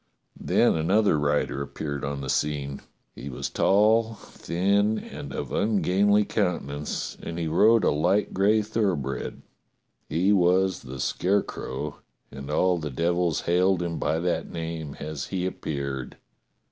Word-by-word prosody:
Then -, -, +3 dB
another 90 Hz, +1 st, +3 dB
rider 75 Hz, -1 st, 0 dB
appeared 70 Hz, 0 st, -5 dB
on 70 Hz, 0 st, -3 dB
the 70 Hz, -, -5 dB
scene. 70 Hz, -2 st, -1 dB, 0.3 s
He 70 Hz, -, -8 dB
was 65 Hz, -, -5 dB
tall, 110 Hz, +3 st, +3 dB
thin, 100 Hz, +4 st, 0 dB
and 70 Hz, -, -8 dB
of -, -, -5 dB
ungainly 105 Hz, 0 st, +2 dB
countenance, 75 Hz, -9 st, -2 dB
and 85 Hz, -, -6 dB
he 85 Hz, -1 st, -2 dB
rode 105 Hz, +8 st, +4 dB
a -, -, +4 dB
light 90 Hz, +8 st, +1 dB
gray 105 Hz, +3 st, +3 dB
thoroughbred. 95 Hz, -, -2 dB, 0.7 s
He 95 Hz, +5 st, +2 dB
was 95 Hz, 0 st, +3 dB
the 65 Hz, +1 st, -8 dB
Scarecrow, 90 Hz, -6 st, -2 dB, 0.3 s
and 70 Hz, +1 st, -8 dB
all 90 Hz, +3 st, +2 dB
the 80 Hz, -1 st, -4 dB
devils 85 Hz, +3 st, 0 dB
hailed 90 Hz, +1 st, +2 dB
him 85 Hz, -1 st, -3 dB
by 80 Hz, -, 0 dB
that 85 Hz, +1 st, -1 dB
name 80 Hz, -3 st, -5 dB
as 75 Hz, -1 st, -5 dB
he 90 Hz, -2 st, -2 dB
appeared. 70 Hz, -7 st, -4 dB
85 Hz, 135 wpm, -26 LUFS, 75-100 Hz, 0.7 s, rode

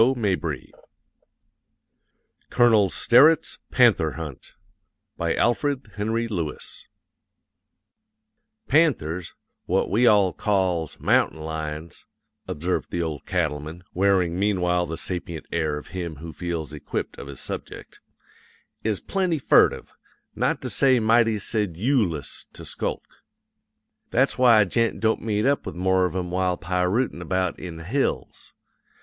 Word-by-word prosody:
Putnam's 115 Hz, -6 st, +2 dB
Sons.] -, -, -5 dB, 1.8 s
COLONEL 110 Hz, -5 st, +4 dB
STERETT'S 140 Hz, -, +4 dB
PANTHER 115 Hz, -, +4 dB
HUNT 75 Hz, -6 st, -8 dB, 0.6 s
BY 85 Hz, -1 st, -1 dB
ALFRED 130 Hz, -1 st, 0 dB
HENRY 110 Hz, +3 st, -1 dB
LEWIS 85 Hz, -9 st, -5 dB, 1.8 s
"Panthers, 90 Hz, -, +1 dB, 0.3 s
what 95 Hz, +2 st, 0 dB
we 120 Hz, +5 st, +4 dB
all 100 Hz, -5 st, +4 dB
calls 95 Hz, -6 st, -1 dB
'mountain -, -, +2 dB
lions,'" 80 Hz, 0 st, -6 dB, 0.4 s
observed 85 Hz, +5 st, -2 dB
the 85 Hz, -, -2 dB
Old 80 Hz, -3 st, -5 dB
Cattleman, 80 Hz, -1 st, -2 dB
wearing 90 Hz, -2 st, +2 dB
meanwhile 90 Hz, -3 st, +1 dB
the 80 Hz, +1 st, -5 dB
sapient 85 Hz, -3 st, -5 dB
air 80 Hz, -3 st, -1 dB
of 75 Hz, -, -10 dB
him 85 Hz, -3 st, -5 dB
who 80 Hz, +3 st, -9 dB
feels 85 Hz, -4 st, -4 dB
equipped 75 Hz, -, -5 dB
of -, -, -8 dB
his 70 Hz, -2 st, -9 dB
subject, -, -, -8 dB, 0.8 s
"is 105 Hz, -3 st, 0 dB
plenty 185 Hz, -4 st, 0 dB
furtive, 135 Hz, -, +3 dB, 0.4 s
not -, -, -1 dB
to -, -, -2 dB
say 130 Hz, -2 st, +4 dB
mighty 115 Hz, 0 st, +3 dB
sedyoolous 105 Hz, -, -1 dB
to -, -, -10 dB
skulk. -, -, -4 dB, 1.0 s
That's 130 Hz, +3 st, +2 dB
why 120 Hz, -4 st, +6 dB
a -, -, +3 dB
gent 115 Hz, +4 st, 0 dB
don't 110 Hz, 0 st, +1 dB
meet 105 Hz, -1 st, -1 dB
up 140 Hz, +1 st, +2 dB
with -, -, -7 dB
more 95 Hz, +1 st, +2 dB
of 90 Hz, -1 st, -3 dB
'em 90 Hz, -2 st, -3 dB
while 90 Hz, -1 st, 0 dB
pirootin' 90 Hz, +4 st, -1 dB
about 90 Hz, +1 st, -1 dB
in 85 Hz, -3 st, -7 dB
the 80 Hz, -, -9 dB
hills. 130 Hz, -, -2 dB
95 Hz, 125 wpm, -24 LUFS, 85-115 Hz, 1.8 s, why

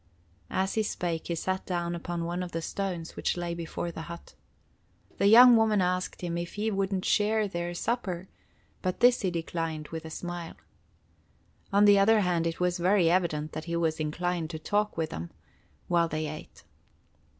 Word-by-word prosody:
As 190 Hz, +1 st, 0 dB
he 220 Hz, -, +1 dB
spake 175 Hz, -6 st, -3 dB
he 170 Hz, -, -1 dB
sat 185 Hz, +3 st, -2 dB
down 175 Hz, -1 st, -1 dB
upon 170 Hz, 0 st, -4 dB
one 175 Hz, +2 st, -2 dB
of 180 Hz, -1 st, -6 dB
the 165 Hz, -, -2 dB
stones 180 Hz, -4 st, -4 dB
which -, -, -1 dB
lay 175 Hz, -1 st, -2 dB
before 170 Hz, 0 st, -4 dB
the 160 Hz, -, -7 dB
hut. 170 Hz, 0 st, -9 dB, 0.9 s
The 200 Hz, -, +4 dB
young 240 Hz, +3 st, +9 dB
woman 220 Hz, -2 st, +3 dB
asked 180 Hz, 0 st, -1 dB
him 170 Hz, -1 st, -2 dB
if 170 Hz, 0 st, -6 dB
he 215 Hz, +2 st, -1 dB
wouldn't 195 Hz, -1 st, -1 dB
share 215 Hz, 0 st, +2 dB
their 175 Hz, -2 st, -4 dB
supper, 190 Hz, -4 st, -2 dB, 0.5 s
but 185 Hz, -1 st, -2 dB
this 245 Hz, 0 st, +5 dB
he 190 Hz, -, +1 dB
declined 165 Hz, -2 st, -3 dB
with 165 Hz, 0 st, -6 dB
a 160 Hz, -, -7 dB
smile. 175 Hz, 0 st, -6 dB, 1.2 s
On 200 Hz, +1 st, +5 dB
the 205 Hz, -1 st, +7 dB
other 215 Hz, +2 st, +5 dB
hand 175 Hz, -3 st, +1 dB
it 165 Hz, -, -4 dB
was 180 Hz, 0 st, 0 dB
very 180 Hz, -1 st, +4 dB
evident 155 Hz, -4 st, 0 dB
that 155 Hz, -, -6 dB
he 170 Hz, 0 st, -3 dB
was 160 Hz, -2 st, 0 dB
inclined 165 Hz, +2 st, -2 dB
to 160 Hz, -, -5 dB
talk 210 Hz, +5 st, -1 dB
with 160 Hz, -1 st, -1 dB
them, 85 Hz, +2 st, -5 dB, 0.6 s
while 170 Hz, -1 st, +3 dB
they 155 Hz, -1 st, -3 dB
ate. 155 Hz, 0 st, -9 dB
175 Hz, 185 wpm, -28 LUFS, 165-195 Hz, 1.2 s, young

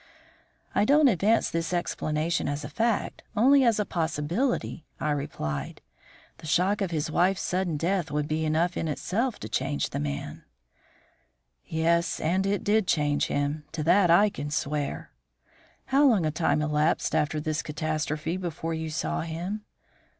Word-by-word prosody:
"I -, -, +3 dB
don't 290 Hz, +5 st, +5 dB
advance 215 Hz, +2 st, +2 dB
this 165 Hz, +1 st, -2 dB
explanation 165 Hz, -2 st, -1 dB
as 145 Hz, +1 st, -3 dB
a -, -, -6 dB
fact, 230 Hz, -1 st, -1 dB, 0.2 s
only 270 Hz, +5 st, +6 dB
as 230 Hz, -3 st, +3 dB
a 210 Hz, -, +1 dB
possibility," 165 Hz, -, -1 dB, 0.2 s
I 150 Hz, -, 0 dB
replied. 75 Hz, -, -4 dB, 0.6 s
"The -, -, -9 dB
shock 185 Hz, +7 st, +2 dB
of 195 Hz, -, 0 dB
his 155 Hz, -2 st, -2 dB
wife's 185 Hz, +4 st, +2 dB
sudden 180 Hz, -3 st, -1 dB
death 175 Hz, +1 st, 0 dB
would 150 Hz, 0 st, -1 dB
be 155 Hz, +1 st, -1 dB
enough 160 Hz, +3 st, +1 dB
in 165 Hz, -, -2 dB
itself 210 Hz, -, -1 dB
to -, -, -5 dB
change 140 Hz, +2 st, -1 dB
the -, -, -3 dB
man." 70 Hz, -1 st, -4 dB, 1.2 s
"Yes, 165 Hz, +1 st, +1 dB
and 185 Hz, +5 st, +1 dB
it 200 Hz, +1 st, 0 dB
did 210 Hz, -1 st, +2 dB
change 145 Hz, -2 st, +1 dB
him; 145 Hz, +2 st, -1 dB
to 155 Hz, -2 st, -2 dB
that 180 Hz, +3 st, +4 dB
I 200 Hz, +5 st, +5 dB
can 145 Hz, -3 st, -5 dB
swear." 145 Hz, 0 st, -3 dB, 0.7 s
"How 280 Hz, +2 st, +4 dB
long 210 Hz, -10 st, +3 dB
a 155 Hz, -, +1 dB
time 155 Hz, -1 st, +1 dB
elapsed 150 Hz, +2 st, +1 dB
after 150 Hz, +1 st, +1 dB
this 155 Hz, +1 st, -2 dB
catastrophe 155 Hz, +2 st, -2 dB
before 165 Hz, -2 st, -4 dB
you 160 Hz, 0 st, -3 dB
saw 155 Hz, +2 st, -2 dB
him?" 175 Hz, +6 st, -4 dB
165 Hz, 155 wpm, -27 LUFS, 150-195 Hz, 1.2 s, only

